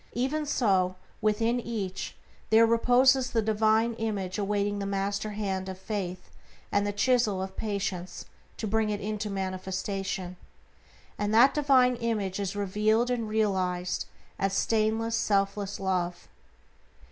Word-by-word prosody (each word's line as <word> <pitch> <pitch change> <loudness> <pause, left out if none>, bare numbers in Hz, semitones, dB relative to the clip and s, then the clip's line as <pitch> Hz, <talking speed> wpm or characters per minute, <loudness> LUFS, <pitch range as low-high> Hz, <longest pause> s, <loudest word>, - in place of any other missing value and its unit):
Even 285 +5 -1
so, 190 -9 +2 0.3
within 225 +3 +1
each 210 -6 -4 0.3
there 225 +1 +6
reposes 250 +3 +4
the 225 - +1
Divine 220 +2 +2
Image 200 -4 -2
awaiting 205 0 0
the 200 - -3
master 200 +1 -1
hand 190 -2 -2
of 190 - -6
Faith 185 -2 -5 0.4
and 205 0 +2
the - - 0
chisel 215 -2 +2
of 190 0 -5
Patience 195 -4 -3 0.3
to - - -3
bring 215 +1 +1
it 205 -1 -2
into 210 +1 -3
manifestation. 190 -1 -3 0.8
And 205 0 0
that 245 +4 +7
Divine 260 -4 +4
Image 210 -5 -2
is 200 0 -3
revealed 215 +4 +1
and 230 -3 -1
realized 185 -4 0 0.3
as 195 0 0
stainless, 225 +2 +1
selfless 200 0 0
Love. 180 -2 -2
205 Hz, 130 wpm, -28 LUFS, 190-225 Hz, 0.8 s, that